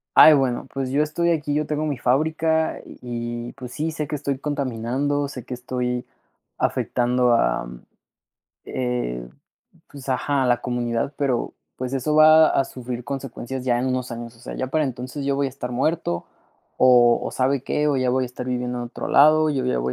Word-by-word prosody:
"Ay, 155 - +10
bueno, 130 -4 +1
pues 135 -1 -3
yo 145 +3 +3
estoy 170 +3 0
aquí, 150 -3 -1
yo 150 +1 0
tengo 150 0 -1
mi 145 -4 -2
fábrica, 160 +5 +1
y - - -13 0.5
y, - - -9
pues 125 -1 -9
sí, 160 +2 -2
sé 155 -2 -4
que 150 - -3
estoy 140 -2 -2
contaminando, 140 +1 -1
sé 130 -3 -8
que 125 - -7
estoy 125 0 -3 0.6
afectando 125 0 +1
a - - +1 1.0
eh, 125 - -3 0.6
pues, 140 -1 -11
ajá, 135 +2 +1
a - - +2
la 120 -1 +2
comunidad, 120 +2 -2
pero, 135 -4 -1 0.2
pues, 130 0 -4
eso 145 +3 0
va 155 0 +7
a 135 - +2
sufrir 125 -1 -6
consecuencias 135 -1 -5
ya 120 -2 +2
en 125 - -1
unos 125 -1 -2
años, 115 0 -7
o - - -22
sea, - - -7
ya 130 - -2
para 155 +2 +1
entonces 130 +2 -5
yo 140 0 +1
voy 140 0 +1
a - - -1
estar 125 -2 -6
muerto, 135 - -1 0.5
o 120 -2 +6
o - - -3
¿sabe 130 0 0
qué? 150 +2 0
O 145 - +1
ya 130 -1 +1
voy 130 0 +1
a - - -4
estar 125 0 -7
viviendo 125 0 -2
en 120 - -3
otro 120 - -6
lado, 155 +2 +6
yo 135 -3 -1
ya 125 - 0
voy 65 +1 -1
130 Hz, 200 wpm, -23 LUFS, 125-145 Hz, 1.0 s, Ay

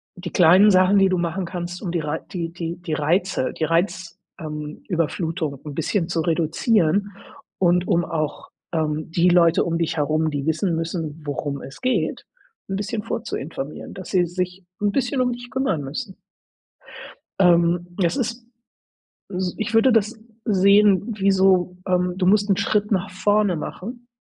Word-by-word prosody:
die 180 -1 -7
kleinen 185 +4 +6
Sachen, 185 +1 +5
die 195 - +5
du 185 - +1
machen 175 +2 -2
kannst, 175 0 -6
um 180 - -3
die 170 -2 -1
Rei 150 +1 -2
die 170 -3 -4
die 170 -1 -4
die 175 -2 -5
Reize 165 0 0
die - - -4
Reiz 170 +2 -1 0.2
ähm, 150 -2 -7
Überflutung 165 -2 -1
'n 150 - -6
bisschen 165 +3 -1
zu 165 -1 0
reduzieren 170 +4 +1 0.5
und 180 0 +2
um 170 0 +2
auch, 155 -3 -3 0.2
ähm, 155 -1 -1
die 175 +2 +3
Leute 170 -1 +4
um 165 -1 -1
dich 165 0 -1
herum, 155 +2 +1
die 140 -1 -3
wissen 160 +2 0
müssen, 165 -1 -4
worum 140 0 -3
es 135 - -11
geht, 225 -11 -1 0.4
'n 195 - -2
bisschen 210 +2 -3
vorzuinformieren, 145 -4 -5
dass 185 - -8
sie 180 -2 +3
sich 180 +2 -4 0.2
'n 205 -1 +2
bisschen 255 +1 0
dich 245 0 -9
kümmern 240 - 0
müssen. 185 - -6 1.2
Ähm, 175 -1 +4
das 175 0 +1
ist 240 -2 -3 0.8
S 185 -2 -3
ich 215 0 -3
würde 225 +3 +5
das 225 +1 +1 0.3
sehen, 205 +1 +4
wie 195 0 +3
so, 190 -2 +3
ähm, 180 -1 +1
du 185 - +1
musst 205 +2 +3
'n 195 - +4
Schritt 205 +1 0
nach 190 -3 0
vorne 205 0 +1
machen 235 +10 -7
180 Hz, 165 wpm, -22 LUFS, 165-200 Hz, 1.2 s, kleinen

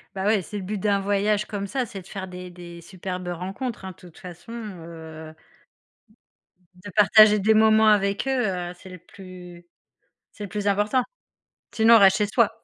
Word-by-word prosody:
Bah 190 - -3
ouais, 210 -1 +2
c'est 205 +4 -8
le 195 - -6
but 205 +3 -4
d'un 200 0 +1
voyage 205 +1 0
comme 200 -2 -5
ça, 255 +5 -2
c'est 195 -4 -9
de 180 - -17
faire 190 -2 -7
des 180 0 -9
des 170 -1 -11
superbes 180 0 -7
rencontres, 190 +6 -5
hein, 190 - -6
de 180 - -17
toute 175 -3 -17
façon, 180 +5 -12
heu 165 -7 -9 1.4
de 195 +3 -11
partager 210 0 +6
des 220 +3 +3
moments 220 0 +4
avec 200 +3 +2
eux, 260 -3 +1
heu, 180 -2 -4
c'est 190 - -13
le 180 -1 -11
plus 180 -1 -13 0.7
c'est 210 - -10
le 200 - -7
plus 205 0 -4
important. 210 +6 +1 0.7
Sinon, 230 +1 +5
on - - +7
reste 195 0 +5
chez 210 -1 0
soi. 225 0 +2
195 Hz, 190 wpm, -24 LUFS, 180-210 Hz, 1.4 s, on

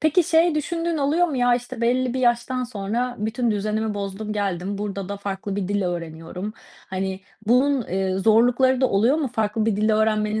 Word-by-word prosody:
Peki 315 +3 +3
şey 325 +1 +3
düşündüğün 330 +2 -1
oluyor 305 +5 +2
mu? 295 - -3
Ya, 245 -1 +4
işte, 245 0 -5
belli 250 +1 +1
bir 260 - -1
yaştan 250 +1 +1
sonra 240 +3 -3
bütün 225 +3 -1
düzenimi 215 +1 -1
bozdum, 200 +1 -4
geldim. 200 -1 -2
Burada 200 -2 -4
da 200 - -4
farklı 200 0 -4
bir 190 -2 -2
dil 205 0 0
öğreniyorum. 175 +3 -5 0.3
Hani, 190 0 -3 0.3
bunun, 260 +3 +3
eee, 190 0 -1
zorlukları 245 +5 +4
da 260 - +4
oluyor 225 +9 +3
mu? 295 -5 -1
Farklı 220 -1 -1
bir 220 -3 +1
dil 215 +1 +2
öğrenmenin 215 0 +1
220 Hz, 185 wpm, -23 LUFS, 200-255 Hz, 0.3 s, Ya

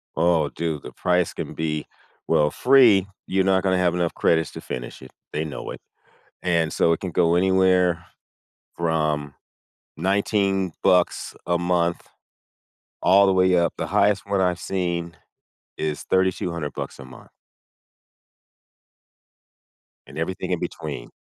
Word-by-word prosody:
Oh, 85 0 +2
dude, 80 -4 -4
the - - -8
price 90 +3 0
can - - -6
be 75 -1 -3 0.4
well, 75 0 +3
free. 120 -8 +5 0.2
You're 95 0 +1
not 95 0 +2
gonna 95 -1 +2
have 90 -1 +2
enough 85 -1 -1
credits 80 -2 +1
to - - -9
finish - - -7
it. 65 - -12 0.2
They 80 +1 -1
know 75 - -6
it. - - -8 0.6
And 85 -3 +1
so, 85 - +3
it - - -3
can 90 -3 -5
go 85 +1 +2
anywhere 90 -2 +3 0.7
from 75 -4 -1 0.6
$19 95 0 0
bucks 90 -1 +2
a 85 0 +2
month, 85 -1 0 0.9
all 100 +1 +5
the 95 - +3
way 95 -1 +3
up 85 -1 +1
the - - -3
highest 100 0 +2
one 100 -1 +1
I've 90 -1 +1
seen 85 -3 -3 0.6
is 75 -1 -3
$3,200 90 -5 -1
bucks - - -6
a 65 - -9
month. 65 -1 -14 2.8
And - - -12
everything 85 +3 -3
in - - 0
between. - - -6
90 Hz, 140 wpm, -23 LUFS, 80-95 Hz, 2.8 s, free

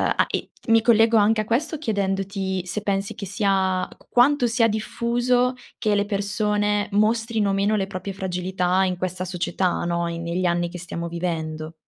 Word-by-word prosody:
a - - +3
e - - -3 0.2
mi 225 0 +5
collego 225 0 +5
anche 215 +1 +4
a - - -5
questo 290 +9 0
chiedendoti 195 - -2
se 185 +4 -3
pensi 195 -1 -1
che 200 -3 -7
sia 190 -2 +1
q - - -19
quanto 250 +1 +4
sia 230 0 +3
diffuso, 240 +3 0 0.2
che 215 - +1
le 205 0 +1
persone 205 0 0
mostrino 220 -1 +1
meno 200 +2 +2
le 195 -2 0
proprie 195 +1 -5
fragilità 185 0 0
in 185 -1 0
questa 185 0 -3
società, 180 0 -1
no, 170 0 0
in 170 0 -4
negli 175 +2 -1
anni 175 0 +1
che 180 +1 -8
stiamo 170 -1 -5
vivendo. 160 -2 -4
195 Hz, 170 wpm, -23 LUFS, 180-220 Hz, 0.2 s, mi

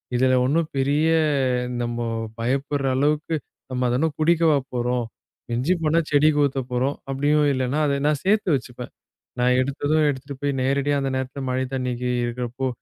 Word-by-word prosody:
இதுல 130 +1 +3
ஒண்ணும் 155 +4 +1
பெரிய 145 +4 +2 0.7
நம்ம 120 0 -3 0.4
பயப்படுற 135 +4 -1
அளவுக்கு, 150 +3 +1 0.4
நம்ம 125 0 -1
அத 120 - +1
என்னா 160 - +2
குடிக்கவா 165 -1 +4 0.2
போறோம்? 120 0 0 0.4
மிஞ்சிப் 150 +9 0
போனா 160 +2 +3
செடிக்கு 150 +1 +4
ஊத்தப்போறோம், 130 0 -1 0.2
அப்டியும் 145 +2 +2
இல்லன்னா 130 +3 -1
அத 140 - +1
நான் 150 -2 +1
சேர்த்து 205 -1 +2
வச்சுப்பேன். 125 -1 -6 0.5
நான் 125 +1 +3
எடுத்ததும் 145 +3 +1
எடுத்துட்டு 140 0 -5
போய் 145 0 0
நேரடியா 140 +2 +1
அந்த 135 - -1
நேரத்துல 130 +2 -4
மழைத் 130 +1 -2
தண்ணி 125 -1 -1 0.3
இருக்கறப்போ 125 +2 -3
135 Hz, 145 wpm, -23 LUFS, 125-150 Hz, 0.7 s, குடிக்கவா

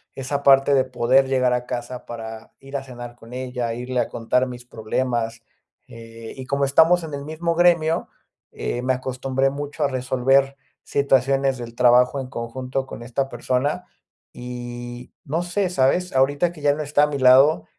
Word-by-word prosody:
esa 140 +2 -3
parte 135 0 +5
de 130 - +4
poder 130 +1 +2
llegar 130 -2 +2
a 125 0 -1
casa 125 0 -5
para 110 -1 -8
ir 135 +1 -11
a 135 - -6
cenar 120 -2 -9
con 115 0 -14
ella, 125 -2 -3
irle 125 +1 -3
a - - +1
contar 125 +3 0
mis 125 -1 -9
problemas, 115 0 -2 0.5
eh, 115 0 -11
y 130 - -8
como 140 +1 0
estamos 165 +5 +4
en 155 - -7
el 140 0 -5
mismo 165 +3 -2
gremio, 170 -2 +3 0.4
eh, 120 - -3
me 130 +1 +1
acostumbré 130 +1 -1
mucho 145 +2 -4
a - - +4
resolver 135 +1 +1 0.3
situaciones 135 -1 +2
del 120 -1 -8
trabajo 125 +2 +4
en 130 - -5
conjunto 130 +2 -4
con 120 - -8
esta 130 +3 -2
persona 145 +9 -1 0.5
y, 120 0 -8
no 160 +5 -1
sé, 180 +2 -1
¿sabes? 180 +3 +1
Ahorita 145 +6 +2
que 155 - -13
ya 145 0 +3
no 155 - -4
está 145 0 +2
a - - +4
mi 145 -1 -4
lado, 130 -5 +6
130 Hz, 175 wpm, -22 LUFS, 125-140 Hz, 0.5 s, lado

